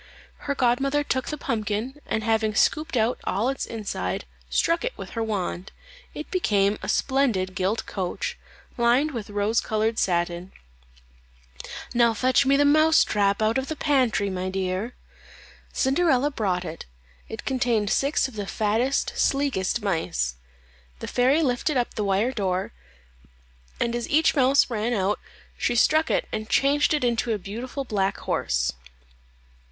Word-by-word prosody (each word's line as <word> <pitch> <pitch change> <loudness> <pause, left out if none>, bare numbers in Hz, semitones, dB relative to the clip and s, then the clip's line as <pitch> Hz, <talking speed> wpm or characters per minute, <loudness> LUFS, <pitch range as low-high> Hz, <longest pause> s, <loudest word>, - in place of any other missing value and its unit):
Her 280 - +1
godmother 275 +3 +2
took 260 -2 -1
the 300 - -3
pumpkin, 225 +4 -3
and 220 - -1
having 220 -1 +1
scooped 310 +1 +2
out 225 +2 +1
all 215 +7 0
its 270 - -3
inside, 145 - -4 0.2
struck 335 - +1
it - - -3
with - - -8
her 230 - -3
wand; 195 -4 -3 0.4
it 300 - -7
became 205 - +1
a - - -5
splendid 240 -9 +1
gilt 190 +4 -1
coach, 185 -3 -3 0.4
lined 245 +6 +3
with 230 -6 -6
rose 205 +2 +1
coloured 220 +1 0
satin. 175 0 -1 1.4
"Now 235 -2 +3
fetch 260 +4 +3
me 275 0 +5
the 290 - +4
mouse 310 +2 +5
trap 200 0 +1
out 220 +4 +2
of 265 - -5
the 315 - -3
pantry, 255 -9 +1
my 185 0 -3
dear." 190 +4 -2 0.8
Cinderella 280 0 +2
brought 185 -8 -1
it; 165 0 -7 0.4
it 220 - -7
contained 240 -6 +1
six 280 0 +2
of 260 - -12
the 205 -2 -4
fattest, 225 +7 0
sleekest 245 -7 0
mice. 165 - -1 0.6
The - - -7
fairy 265 +6 +3
lifted 260 +2 0
up 245 - -1
the 215 - -2
wire 200 +5 +1
door, 190 - -2 1.1
and 235 0 0
as 240 - -3
each 315 +2 +4
mouse 275 -1 +4
ran 230 0 -1
out 200 +1 0 0.4
she 240 - 0
struck 315 +7 +3
it - - 0
and 215 0 -4
changed 290 +2 +3
it 295 - -2
into 235 -1 +1
a - - -1
beautiful 235 +8 -5
black 195 -4 0
horse. - - 0
230 Hz, 150 wpm, -25 LUFS, 200-270 Hz, 1.4 s, me